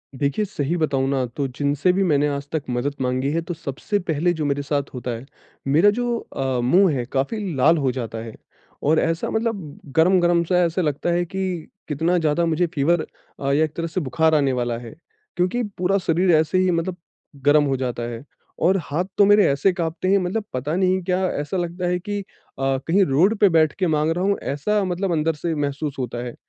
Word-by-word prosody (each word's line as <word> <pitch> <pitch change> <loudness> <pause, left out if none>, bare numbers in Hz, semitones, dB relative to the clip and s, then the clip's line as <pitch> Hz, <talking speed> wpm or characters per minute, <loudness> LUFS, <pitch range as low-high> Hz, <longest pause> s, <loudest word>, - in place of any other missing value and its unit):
देखिए 140 +10 0
सही 150 -3 -2
बताऊँ 140 -5 0
ना 135 -2 0
तो 140 -2 -1
जिनसे 145 +6 +1
भी 195 - +1
मैंने 150 -5 +2
आज 140 0 -4
तक 160 -3 -2
मदद 125 +4 -1
माँगी 130 +2 0
है 165 +1 0
तो 175 - -5
सबसे 165 +6 -3
पहले 175 0 0
जो 155 -3 -3
मेरे 145 0 0
साथ 140 0 -1
होता 125 -1 -4
है, 115 +2 -6 0.4
मेरा 160 +9 +5
जो 240 +2 0
अ, 130 -2 -3
मुँह 175 +7 +4
है 125 -2 -2
काफ़ी 140 +11 -1 0.2
लाल 160 +6 +4
हो 135 -4 +1
जाता 115 -3 -5
है 115 - -9 0.5
और 155 +2 +3
ऐसा 165 0 -1
मतलब 220 -9 -3 0.2
गरम-गरम 175 0 +4
सा 180 +1 +2
ऐसे 170 +2 -1
लगता 150 +1 -1
है 175 +1 +1
कि 185 -2 -4 0.2
कितना 165 +4 +1
ज़्यादा 160 +1 +1
मुझे 170 +1 +1
फ़ीवर 155 +3 +2 0.5
या 155 - +3
एक 155 -1 -2
तरह 165 0 -2
से 180 +3 -2
बुखार 160 +3 +2
आने 140 -3 +2
वाला 120 -2 -1
है। 120 +2 -9 0.4
क्योंकि 185 +8 0
पूरा 185 +2 +2
शरीर 180 0 +2
ऐसे 155 +3 +2
ही 185 0 +3
मतलब 170 +2 -1 0.5
गरम 145 +1 +5
हो 135 -1 0
जाता 125 -2 -3
है 120 +2 -7 0.4
और 190 +3 +4
हाथ 165 +6 -2
तो 205 - +6
मेरे 205 0 +6
ऐसे 140 +8 +2
काँपते 170 0 -3
हैं 195 +1 +4
मतलब 195 +4 -1
पता 140 +5 -2
नहीं 185 0 +2
क्या, 185 +1 0
ऐसा 145 +2 -3
लगता 175 +1 -2
है 180 0 0
कि 205 +2 -4
अ, 135 -7 -4
कहीं 195 +4 +4
रोड 180 +11 +3
पे 205 - +6
बैठ 160 -3 +3
के 185 - +2
माँग 155 0 +1
रहा 175 +3 -1
हूँ, 200 0 +2
ऐसा 200 +10 0
मतलब 185 0 -1
अंदर 160 0 +1
से 160 +2 -3
महसूस 145 0 -2
होता 120 -1 -3
है। 120 - -7
160 Hz, 210 wpm, -22 LUFS, 140-180 Hz, 0.5 s, तो